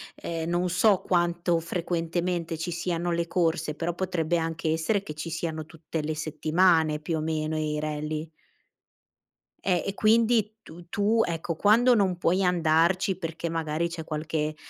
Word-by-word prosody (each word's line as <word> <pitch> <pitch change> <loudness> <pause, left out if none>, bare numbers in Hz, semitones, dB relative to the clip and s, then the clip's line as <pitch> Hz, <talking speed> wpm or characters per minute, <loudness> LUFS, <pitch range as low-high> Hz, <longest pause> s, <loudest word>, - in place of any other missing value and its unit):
ehm, 165 0 -4
non 175 +1 0
so 195 +1 +3
quanto 175 -1 +1
frequentemente 170 0 -2
ci 175 +2 -3
siano 170 0 -2
le 170 0 0
corse, 165 -3 0
però 170 +2 -2
potrebbe 175 -2 -1
anche 165 0 -2
essere 165 +6 +1
che 150 - -6
ci 155 +2 -6
siano 160 -1 -3
tutte 160 0 -5
le 155 +1 -3
settimane 155 +1 +2
più 160 +1 -2
o - - -2
meno 155 0 -1
i 150 -1 -1
rally. 155 +1 -3 1.3
Eh, 180 -3 +1
e 195 - -2
quindi 220 0 +3
tu 170 -2 -13
tu, 215 +3 +2
ecco, 165 0 -3
quando 235 +7 +5
non 190 -5 +2
puoi 180 +3 +2
andarci 175 +2 +2
perché 165 -1 -4
magari 160 0 -1
c'è 165 -1 -6
qualche, 155 0 -2
170 Hz, 155 wpm, -27 LUFS, 160-180 Hz, 1.3 s, quando